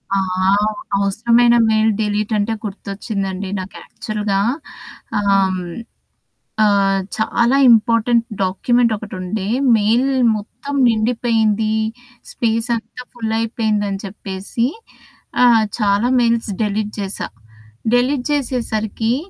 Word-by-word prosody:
ఆ! -, -, +2 dB, 0.8 s
అవసరమైన 235 Hz, +4 st, +3 dB
mail 220 Hz, 0 st, +3 dB
delete 210 Hz, +1 st, -1 dB
అంటే 210 Hz, +2 st, 0 dB
గుర్తొచ్చిందండి. 195 Hz, -1 st, -4 dB
నాకు 185 Hz, +1 st, -8 dB
యాక్చువల్‌గా 210 Hz, -2 st, -3 dB, 0.8 s
ఆహ్, 195 Hz, -2 st, +2 dB, 1.1 s
ఆహ్, 195 Hz, -1 st, +3 dB, 0.2 s
చాలా 235 Hz, +3 st, +1 dB
ఇంపార్టెంట్ 230 Hz, +1 st, +3 dB, 0.2 s
డాక్యుమెంట్ 235 Hz, +5 st, +1 dB
ఒకటి 210 Hz, 0 st, -9 dB
ఉండే. 190 Hz, +2 st, -3 dB, 0.3 s
మెయిల్ 230 Hz, +6 st, +2 dB, 0.3 s
మొత్తం 250 Hz, +7 st, -7 dB
నిండిపోయింది. 220 Hz, -1 st, +1 dB, 0.6 s
స్పేస్ 230 Hz, 0 st, -1 dB
అంతా 230 Hz, +2 st, -8 dB
ఫుల్లయిపోయిందని 220 Hz, -3 st, -1 dB
చెప్పేసి 195 Hz, +3 st, -3 dB, 0.8 s
ఆహ్, 230 Hz, -3 st, +6 dB
చాలా 205 Hz, +1 st, +2 dB
మెయిల్స్ 230 Hz, -2 st, +1 dB
డిలీట్ 210 Hz, 0 st, -1 dB
జేశా. 195 Hz, 0 st, -4 dB, 0.7 s
డిలీట్ 250 Hz, +1 st, +1 dB
జేసేసరికి 235 Hz, -5 st, -1 dB
220 Hz, 90 wpm, -18 LUFS, 200-235 Hz, 1.1 s, ఆహ్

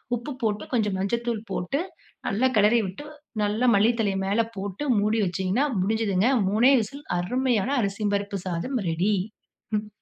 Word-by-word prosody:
உப்பு 240 Hz, +5 st, -6 dB
போட்டு 210 Hz, -2 st, 0 dB
கொஞ்சம் 210 Hz, -5 st, +1 dB
மஞ்சள்தூள் 235 Hz, +2 st, -1 dB
போட்டு, 180 Hz, +11 st, -1 dB, 0.5 s
நல்லா 230 Hz, +6 st, +2 dB
கிளறி 210 Hz, +3 st, +5 dB
விட்டு, 195 Hz, +11 st, -8 dB, 0.4 s
நல்லா 210 Hz, +4 st, +1 dB
மல்லி 210 Hz, +4 st, +5 dB
தழைய 200 Hz, -3 st, 0 dB
மேல 205 Hz, +4 st, +2 dB
போட்டு 195 Hz, +5 st, -4 dB, 0.2 s
மூடி 215 Hz, +2 st, +1 dB
வச்சிங்கன்னா, 190 Hz, +8 st, 0 dB, 0.2 s
முடிஞ்சுதுங்க. 215 Hz, +1 st, +1 dB, 0.2 s
3ணே 235 Hz, +6 st, +5 dB
விசில் 280 Hz, +7 st, -8 dB
அருமையான 245 Hz, +4 st, 0 dB
அரிசி 200 Hz, +1 st, -2 dB
பருப்பு 200 Hz, 0 st, -3 dB
சாதம் 185 Hz, +10 st, -2 dB
ரெடி. 175 Hz, +6 st, +1 dB, 0.6 s
ம். 210 Hz, 0 st, -4 dB
210 Hz, 145 wpm, -25 LUFS, 195-235 Hz, 0.6 s, கிளறி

